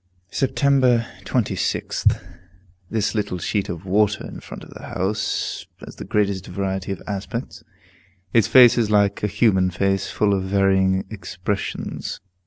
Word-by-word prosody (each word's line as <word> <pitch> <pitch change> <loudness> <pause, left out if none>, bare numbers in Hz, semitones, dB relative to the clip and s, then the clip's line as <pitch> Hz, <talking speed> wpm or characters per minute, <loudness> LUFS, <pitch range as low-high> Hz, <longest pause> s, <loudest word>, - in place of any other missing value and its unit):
Sept. 135 - -1 0.7
26th. 105 -6 0 0.7
This 110 -2 0
little 105 -4 -1
sheet 100 +3 -1
of 90 +2 -6
water 105 +2 +2
in - - -8
front - - -10
of - - -13
the - - -11
house 100 +3 -2 0.2
has - - -12
the - - -7
greatest 100 -3 0
variety 95 -1 -3
of 95 - -5
aspects; 100 -1 -5 0.7
its 115 -3 +4
face 125 -2 +7
is 110 -3 +1
like 100 -1 +2
a 105 - +1
human 100 -3 +3
face, 95 +1 0
full 105 -1 +1
of 95 -1 0
varying 95 -1 +2
expressions. 95 0 -4
100 Hz, 140 wpm, -22 LUFS, 95-105 Hz, 0.7 s, face